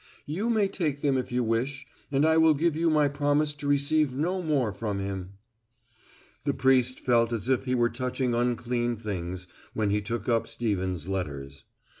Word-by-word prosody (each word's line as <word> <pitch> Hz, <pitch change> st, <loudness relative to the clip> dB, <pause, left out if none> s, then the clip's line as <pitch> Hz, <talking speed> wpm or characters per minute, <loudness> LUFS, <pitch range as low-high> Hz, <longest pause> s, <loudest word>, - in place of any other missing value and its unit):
You 190 Hz, +11 st, -2 dB
may 215 Hz, -4 st, +3 dB
take 150 Hz, -7 st, -2 dB
them 140 Hz, -2 st, +2 dB
if 130 Hz, -1 st, -2 dB
you 125 Hz, 0 st, +1 dB
wish 130 Hz, +4 st, -1 dB, 0.3 s
and 140 Hz, +2 st, +3 dB
I 160 Hz, 0 st, +4 dB
will 160 Hz, -1 st, +5 dB
give 165 Hz, +2 st, +1 dB
you 165 Hz, +1 st, +2 dB
my 150 Hz, -2 st, +4 dB
promise 145 Hz, +1 st, +1 dB
to 145 Hz, -1 st, -6 dB
receive 145 Hz, -1 st, +2 dB
no 180 Hz, +6 st, 0 dB
more 140 Hz, -, 0 dB
from 105 Hz, +1 st, -3 dB
him." 95 Hz, -1 st, -4 dB, 1.1 s
The -, -, 0 dB
priest 130 Hz, -1 st, +3 dB
felt 120 Hz, -2 st, +2 dB
as 115 Hz, +1 st, -2 dB
if 130 Hz, 0 st, +1 dB
he 130 Hz, -1 st, 0 dB
were 120 Hz, -1 st, +3 dB
touching 125 Hz, 0 st, -1 dB
unclean 120 Hz, 0 st, 0 dB
things 95 Hz, -4 st, -5 dB, 0.3 s
when 105 Hz, -2 st, +1 dB
he 105 Hz, +1 st, +1 dB
took 115 Hz, 0 st, -4 dB
up 115 Hz, -2 st, +1 dB
Stevens' 95 Hz, -7 st, -2 dB
letters. 70 Hz, -7 st, -5 dB
125 Hz, 180 wpm, -27 LUFS, 110-145 Hz, 1.1 s, will